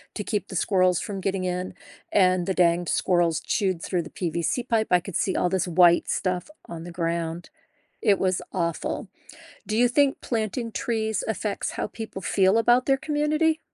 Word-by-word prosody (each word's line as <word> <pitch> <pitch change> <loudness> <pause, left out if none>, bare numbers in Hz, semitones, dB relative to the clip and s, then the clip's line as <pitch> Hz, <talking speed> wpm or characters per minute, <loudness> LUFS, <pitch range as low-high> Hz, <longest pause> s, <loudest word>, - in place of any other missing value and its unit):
to 210 - -3
keep 210 0 -2
the 190 - -8
squirrels 185 -1 +2
from 200 -2 -5
getting 190 -1 -1
in, 180 0 -3 0.4
and 185 -3 +3
the 190 - +1
dang 175 -1 +3
squirrels 175 -3 +2
chewed 185 -4 -1
through 175 -3 -1
the - - -10
PVC 170 +7 -2
pipe. 225 -3 +1
I 180 - +6
could 195 -3 -8
see 190 - 0
all 180 - +1
this 190 0 0
white 175 0 +4
stuff 185 +7 -1 0.2
on 165 -1 -7
the 175 - -8
ground. 170 0 -3 0.5
It 205 -4 +4
was 185 -1 0
awful. 170 -3 -2 0.6
Do 215 - -1
you 245 +1 +5
think 275 +2 +2
planting 230 0 -2
trees 220 -2 -1
affects 215 -1 -2
how - - -3
people 215 -4 -7
feel 190 +4 +3
about 240 +2 +4
their 270 - +4
community? 305 +2 +1
190 Hz, 180 wpm, -25 LUFS, 175-220 Hz, 0.6 s, I